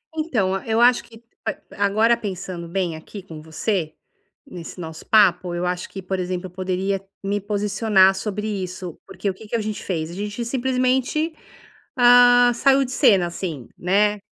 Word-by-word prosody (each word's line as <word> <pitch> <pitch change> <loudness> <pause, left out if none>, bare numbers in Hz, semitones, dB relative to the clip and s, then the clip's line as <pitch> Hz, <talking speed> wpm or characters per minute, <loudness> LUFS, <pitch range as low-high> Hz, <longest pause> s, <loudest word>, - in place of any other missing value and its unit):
Então 250 - 0
a 195 - -5
eu 225 +1 +2
acho 245 +1 +5
que 225 0 -17 0.2
a 220 - -1 0.3
agora, 220 +4 +3
pensando 185 -5 -6
bem 175 -1 -2
aqui 185 +5 -10
com 160 -4 -10
você, 160 +1 -2 0.5
nesse 180 -9 -9
nosso 160 -1 -8
papo, 180 -4 +3
eu 175 +1 -2
acho 180 0 -3
que, 195 - -7
por 190 +1 -3
exemplo, 180 0 -3
eu - - -13
poderia 190 +1 -2 0.2
me 200 +1 -1
posicionar 205 -1 +3
sobre 210 +1 -4
isso, 185 -4 -5
porque 195 +1 -3
o - - -2
que 215 +3 -13
que 220 - -3
a 230 - 0
gente 215 0 -4
fez? 165 -3 -3
A - - -8
gente 205 +4 -4
simplesmente, 260 +5 0 0.6
ah, 245 -1 +7
saiu 275 +3 +3
de 255 - -6
cena 210 - +4
assim, 170 -7 -5
né, 205 +3 +2
200 Hz, 175 wpm, -22 LUFS, 180-230 Hz, 0.6 s, ah